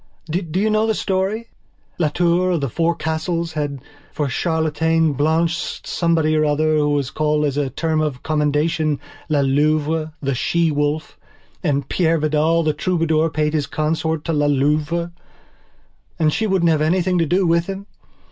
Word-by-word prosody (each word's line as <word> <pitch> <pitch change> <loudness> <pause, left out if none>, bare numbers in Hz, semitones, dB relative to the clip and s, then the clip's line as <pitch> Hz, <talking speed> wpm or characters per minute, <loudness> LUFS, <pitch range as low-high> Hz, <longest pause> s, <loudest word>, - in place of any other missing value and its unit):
Do 170 +1 -2
you 215 +2 +2
know 215 +1 +2
the 220 - +1
story? 200 +5 -1 0.5
Las 155 -4 +1
Tours 175 +2 +2
of 160 - -2
the 140 - -1
Four 170 +4 +1
Castles 160 +1 -2
had 145 -3 -3 0.3
for 150 - -2
chatelaine 160 +1 +1
Blanche 160 +4 0
Somebody 165 -2 +1
or 155 - +3
other 155 +1 +2
who 150 -1 +2
was 145 -2 0
called 150 -1 +1
as 140 -2 -1
a 145 -2 0
term 155 +4 -1
of 145 -5 -3
commendation, 150 0 0 0.3
La 150 -2 +2
Louvethe 155 +3 +1 0.3
She 165 +5 +1
Wolf. 145 +1 -2 0.4
And 140 -4 0
Peire 165 -2 +1
Vidal 155 +2 +2
the 155 -1 +1
Troubadour 165 -1 +1
paid 150 0 -1
his 150 -2 0
court 160 0 -1
to 165 - -1
La 145 -1 +2
Louve. 150 +4 +1 1.1
And 155 -3 +2
she 220 - 0
wouldn't 180 -4 +2
have 155 -1 +1
anything 180 +3 +1
to 165 - +1
do 180 +4 +2
with 170 0 +2
him. 195 0 -5
155 Hz, 165 wpm, -20 LUFS, 150-170 Hz, 1.1 s, or